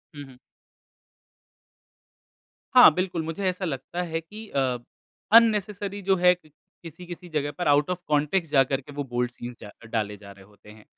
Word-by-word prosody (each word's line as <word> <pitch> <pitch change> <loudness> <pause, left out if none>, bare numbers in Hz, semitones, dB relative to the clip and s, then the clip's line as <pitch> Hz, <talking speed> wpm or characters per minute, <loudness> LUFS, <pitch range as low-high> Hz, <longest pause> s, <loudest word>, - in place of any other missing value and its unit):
हुँ, 145 - -7
हुँ। 130 -2 -16 2.4
हाँ, - - +9
बिल्कुल। 180 -2 -2
मुझे 165 +5 -5
ऐसा 185 +1 -2
लगता 160 +3 -4
है 165 -2 -3
कि 210 +6 -11
अ, 130 -2 0 0.5
अननेसेसरी 210 -3 +3
जो 195 0 +2
है 180 0 +5
क - - -19 0.3
किसी-किसी 175 +2 -10
जगह 145 -1 -1
पर 175 - -2
आउट 145 +2 +3
ऑफ़ 180 -1 -2
कॉन्टेक्स्ट 150 +3 0
जाकर 135 0 +2
के 145 - -13
वो 145 - -3
बोल्ड 125 0 -1
सीन्स 120 0 -9
डा 105 - -9 0.2
डाले 105 -2 -1
जा 100 -1 -13
रहे 95 -1 -15
होते 105 0 -20
हैं। 105 0 -15
150 Hz, 170 wpm, -25 LUFS, 125-180 Hz, 2.4 s, हाँ